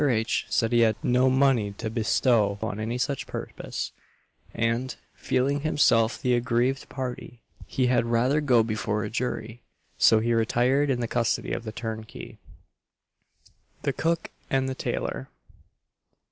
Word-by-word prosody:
H. 115 -5 +1
said 115 -1 +1
he 120 - +4
had 110 -2 +4
no 125 +1 +3
money 130 -6 +2
to 110 +3 -5
bestow 110 -2 +2
on 110 -2 -3
any 115 +3 -2
such 140 +2 -2
purpose; - - -5 0.6
and, 115 +3 -1 0.2
feeling 140 +3 0
himself 130 -6 +2
the 125 -3 +1
aggrieved 125 +2 0
party, 125 -2 -6 0.2
he 130 - 0
had 120 -1 +2
rather 125 +6 +2
go 125 -6 +4
before 105 -1 -2
a 105 - -5
jury; 115 -1 -3 0.4
so 110 - +6
he 115 +2 +1
retired 125 +5 +2
in 125 -2 0
the 120 - -1
custody 115 0 0
of 115 - -4
the 110 - -4
turnkey. 110 -1 -7 1.4
THE - - 0
COOK 165 +1 -1 0.2
AND 135 -1 +1
THE 130 - -2
TAILOR. 65 - -3
120 Hz, 145 wpm, -26 LUFS, 110-130 Hz, 1.4 s, so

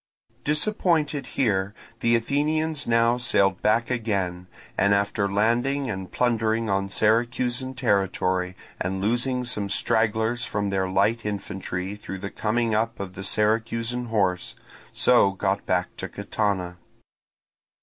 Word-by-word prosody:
Disappointed 150 -3 +1
here, 100 -5 +1 0.2
the 115 0 +3
Athenians 150 +5 0
now 115 +1 +3
sailed 95 -6 +2
back 115 +3 +2
again, 95 -7 -2 0.3
and 100 0 +3
after 100 0 0
landing 120 +6 +1
and 95 -2 -6
plundering 115 -2 +1
on 95 0 0
Syracusan 120 +5 +1
territory 95 -6 0 0.2
and 95 +1 -2
losing 120 +5 0
some 105 -5 -2
stragglers 110 +3 +1
from 100 -3 -2
their 95 -1 0
light 105 +5 +2
infantry 95 -2 -4
through 105 -2 -7
the 100 +1 -6
coming 115 +1 0
up 115 +2 0
of 95 -2 -5
the 95 +1 -7
Syracusan 115 +4 0
horse, 95 -6 0 0.4
so 120 -6 +4
got 100 +1 -1
back 90 0 0
to - - -5
Catana. 100 -3 -2
110 Hz, 125 wpm, -25 LUFS, 95-120 Hz, 0.4 s, so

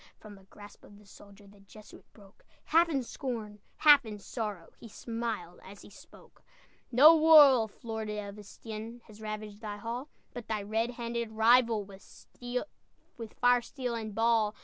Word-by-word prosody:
From 215 -1 -13
the 195 -1 -17
grasp 205 +1 -15
of 205 - -16
the 210 - -19
soldier 200 +1 -17
The 200 0 -19
Jesuit 210 +2 -17
broke, 200 -2 -20 0.2
Half 335 +2 +3
in 275 -5 -1
scorn, 225 -5 -6 0.2
half 295 -2 +6
in 215 -2 -8
sorrow, 205 -4 -6
He - - -11
smiled 225 -6 -6
as 200 +1 -13
he - - -15
spoke: - - -18 0.5
"No 295 +7 +8
wolf, 285 -9 +5
Lord 220 -2 -5
of 210 -1 -6
Estienne, 220 +3 -9
Has 215 0 -16
ravaged 215 -1 -7
thy 210 -2 -6
hall, 235 +7 -6 0.2
But 245 -2 -9
thy 215 -2 -3
red 220 +3 -1
handed 235 -1 -5
rival, 230 -1 +3
With 195 -1 -14 1.4
fire, 245 0 +4
steel, 250 0 -6
and 220 -3 -6
ball! 225 -2 +1
220 Hz, 160 wpm, -29 LUFS, 205-240 Hz, 1.4 s, No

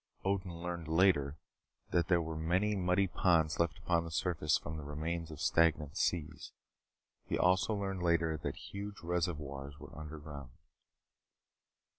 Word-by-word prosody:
Odin 95 -2 0
learned 85 -2 -4
later 80 -4 +3 0.5
that 85 - +2
there 85 -2 +3
were 80 0 -4
many 90 +7 +1
muddy 90 +1 +2
ponds 85 -4 +2
left 85 -1 +1
upon 85 0 +1
the 85 - -6
surface 80 -2 +1
from 80 - -6
the 75 - -6
remains 80 +3 -3
of 75 -3 -8
stagnant 75 -3 +2
seas. 85 -4 -1 0.7
He - - 0
also 95 +4 +3
learned 95 -2 -2
later 85 -2 +2
that - - -4
huge 100 0 -7
reservoirs 75 -5 -2
were - - -11
underground. 75 -4 -8
85 Hz, 140 wpm, -34 LUFS, 75-90 Hz, 0.7 s, later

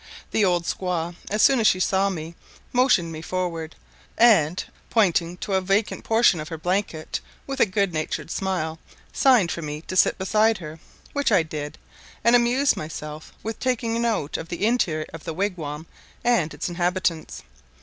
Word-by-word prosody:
The 220 - +2
old 175 -3 +2
squaw, 175 -1 -2
as 210 +1 +2
soon 270 -2 +6
as 220 - +4
she 185 -4 +3
saw 195 +1 +2
me, 165 -3 -5 0.4
motioned 245 -10 +3
me 155 -1 -6
forward, 165 -2 -3 0.4
and 190 -8 +4 0.2
pointing 180 -5 +2
to 195 - -4
a 190 - +3
vacant 195 +3 0
portion 225 -6 +4
of 155 - -5
her 165 - -5
blanket, 175 -1 -2 0.3
with 275 0 -5
a - - +5
good 200 -2 0
natured 155 +1 -3
smile, 165 -5 -2 0.3
signed 245 -11 +4
for 170 - -4
me 150 -1 -5
to 185 - -7
sit - - +4
beside 215 +3 +2
her, 160 -2 -9 0.3
which 285 -4 +1
I 185 -5 +5
did, 150 -2 -6 0.5
and 235 +1 +5
amused 245 +4 +3
myself 150 0 -7
with 225 +1 -4
taking 235 -2 0
note 225 -11 0
of 165 - -7
the 175 +4 -1
interior 175 -10 +1
of 165 - -8
the 165 - -5
wigwam 165 -6 -3 0.4
and 225 -10 +2
its - - -4
inhabitants. 175 -1 -1
185 Hz, 170 wpm, -24 LUFS, 160-220 Hz, 0.5 s, soon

